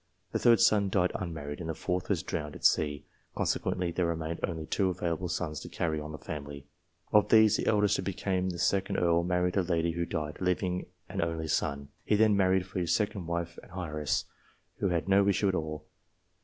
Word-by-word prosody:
The - - 0
third 120 -2 +5
son 105 -4 +4
died 90 -2 +2
unmarried, 75 -5 -5
and 85 -2 -5
the 80 - -2
fourth 90 +3 -2
was - - +1
drowned 75 -1 -4
at - - -7
sea, 75 -2 +2 0.3
consequently 90 -2 0
there 85 0 0
remained 80 0 -3
only 80 -3 -2
two 95 +4 +1
available 90 -1 -2
sons 80 -4 -2
to - - -9
carry 80 -2 -1
on 75 +1 -7
the 75 - -6
family. 70 -3 -7 0.5
Of 105 -1 +5
these, 110 -1 +6
the - - -2
eldest, 105 -1 +3
who - - -2
became 95 0 -1
the 90 - -4
2d 100 +2 +1
Earl, 85 -1 +3
married 90 +1 0
a - - +5
lady 85 -2 0
who 85 0 -2
died, 75 -1 -3
leaving 90 0 0 0.2
an - - -3
only 80 -1 -2
son. 70 -1 -1
He 105 - +2
then 105 0 +4
married 95 -1 +3
for 95 0 -4
his 85 -1 +1
second 105 -5 -2
wife, 85 0 -3
an - - -17
heiress, 75 -4 -1 0.5
who 100 - 0
had 85 0 -1
no 100 0 +4
issue 100 0 +2
at - - 0
all. 80 -3 -3
90 Hz, 210 wpm, -30 LUFS, 80-95 Hz, 0.5 s, these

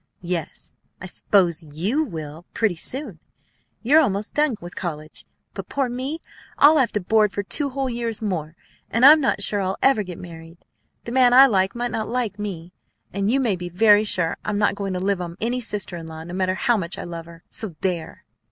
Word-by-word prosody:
"Yes, 170 -3 -4 0.3
I - - -8
s'pose 180 -2 +1
you 175 - -1
will, 160 - -8
pretty 220 -6 +1
soon. 235 - -2 0.6
You're 295 +7 +6
almost 205 -6 -1
done 300 -5 +2 0.2
college. 155 -3 -6 0.3
But - - -7
poor 270 -3 -1
me! 265 +7 -4 0.4
I'll 305 +2 +7
have 260 - +2
to 210 - +1
board 210 +2 +2
for 200 - -3
two 280 +8 0
whole 270 0 -2
years 235 -3 -2
more, 170 -7 -3 0.3
and 230 +3 +3
I'm 305 +2 +9
not 235 -7 +1
sure 205 0 0
I'll 190 0 -2
ever 270 -5 +4
get 180 -4 -7
married. 165 -1 -11 0.5
The 235 - -7
man 250 -1 +4
I 265 +2 +9
like 195 -5 +1
might 240 0 -2
not 220 0 -3
like 230 -4 -2
me. 180 -4 -6 0.4
And 200 +1 0
you 265 +4 +2
may 235 -7 +1
be 175 0 -6
very 205 +3 +5
sure 180 -6 -1
I'm 210 -1 -2
not 205 0 +2
going 195 -1 -4
to 180 - -2
live 195 0 0
on 170 0 -6
any 240 +3 -1
sister 210 -6 -3
in 165 -1 -8
law, 160 0 -8
no 175 +2 -9
matter 185 0 0
how 240 +2 +2
much 170 -3 -3
I - - -5
love 170 -1 -7
her, 165 -1 -14
so 210 -7 -4
there!" 175 -4 -3
200 Hz, 205 wpm, -22 LUFS, 175-240 Hz, 0.6 s, I'm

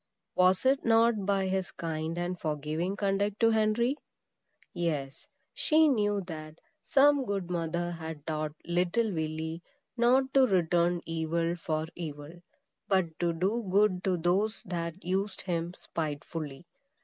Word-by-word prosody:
Was 185 +4 +3
it 270 +1 +3
not 225 -3 +3
by 195 -1 +2
his 190 0 -1
kind 160 0 -4
and 175 0 -2
forgiving 155 +4 -2
conduct 200 +1 0
to 225 0 +5
Henry? 220 +5 +2 0.8
Yes; 150 -6 -3 0.3
she 315 +1 +4
knew 205 -7 +2
that 155 -3 -8 0.2
some 280 0 +4
good 195 -5 -3
mother 175 0 -1
had 160 -3 -7
taught 155 -1 -2
little 180 +6 +1
Willy 160 +1 -3 0.3
not 255 +2 +3
to 270 -1 +6
return 175 -2 +2
evil 165 +1 -1
for 160 -2 -2
evil, 150 -2 -7 0.5
but 180 -5 +1
to 175 -1 +2
do 195 +7 -1
good 190 -1 +3
to 185 -2 +2
those 190 +6 0
that 170 0 -5
used 195 +3 -1
him 175 -1 -2
spitefully. 150 -1 -5
175 Hz, 135 wpm, -30 LUFS, 160-205 Hz, 0.8 s, to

